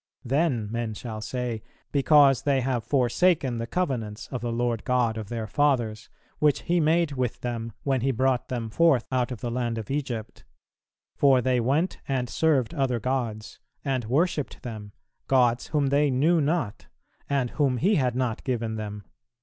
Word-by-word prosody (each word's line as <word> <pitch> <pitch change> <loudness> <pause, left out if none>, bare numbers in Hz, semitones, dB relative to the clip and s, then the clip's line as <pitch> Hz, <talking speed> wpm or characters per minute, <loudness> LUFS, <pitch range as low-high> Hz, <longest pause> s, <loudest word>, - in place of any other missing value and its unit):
Then 135 -4 +1
men 115 -2 -3
shall 110 0 -6
say, 120 0 -3 0.3
Because 140 -2 +5
they 140 -2 +1
have 125 -2 -1
forsaken 130 +1 +2
the 115 - -3
covenants 120 -11 -2
of 125 -4 -3
the 120 0 -2
Lord 120 -1 -1
God 125 -3 +1
of 110 -2 -6
their 115 -2 -3
fathers, 120 -4 0 0.3
which 150 -3 +3
He 175 +1 +1
made 165 0 +2
with 130 -4 -2
them 115 -2 -4
when 135 -3 +1
He 135 - +1
brought 130 0 +1
them 115 -3 -3
forth 140 -3 +3
out 130 -1 0
of 120 -4 -6
the 120 - -3
land 120 -1 -1
of 110 +3 -5
Egypt; 125 -6 -4 0.7
for 135 -2 +5
they 125 0 +1
went 140 +10 0
and 130 -3 -1
served 145 -6 +2
other 135 -6 0
gods, 115 -3 -3 0.3
and 130 -4 -1
worshipped 145 +4 0
them, 110 -4 -7 0.4
gods 125 -2 +3
whom 145 -3 +1
they 145 +1 +3
knew 155 +6 +3
not, 145 -7 -1 0.4
and 135 -4 0
whom 135 -4 +1
He 185 - +2
had 130 - +1
not 125 -3 -1
given 115 -4 -2
them." 105 -1 -6
125 Hz, 170 wpm, -26 LUFS, 115-140 Hz, 0.7 s, Because